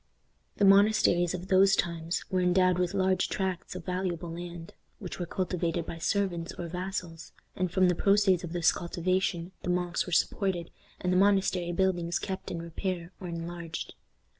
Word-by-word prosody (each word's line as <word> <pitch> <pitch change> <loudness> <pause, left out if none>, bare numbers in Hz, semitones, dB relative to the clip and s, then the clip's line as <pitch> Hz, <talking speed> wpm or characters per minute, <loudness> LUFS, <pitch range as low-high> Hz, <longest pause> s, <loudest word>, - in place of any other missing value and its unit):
The 200 - +4
monasteries 195 -3 +5
of 185 +1 -7
those 195 +1 +5
times 170 0 -2
were 185 -1 +2
endowed 180 0 +3
with 180 +2 0
large 190 -1 +2
tracts 185 -2 -3
of 180 -3 -7
valuable 180 -2 -2
land, 170 0 -7 0.2
which 185 -3 -7
were 175 - -3
cultivated 170 -2 -1
by 165 - -7
servants 175 -1 -1
or 175 - -6
vassals, 180 -2 -5 0.2
and 185 -1 -1
from 185 0 +4
the 180 - +3
proceeds 195 -1 +3
of 170 - -5
this 175 -1 +3
cultivation 180 0 -1
the - - -4
monks 180 0 0
were - - -5
supported, 175 0 0 0.3
and 180 0 0
the - - +3
monastery 190 -3 +3
buildings 175 -2 +1
kept 190 -2 -5
in 170 -1 -4
repair 170 +1 -4
or 185 - -5
enlarged. 170 -1 -5
180 Hz, 165 wpm, -29 LUFS, 170-190 Hz, 0.3 s, monasteries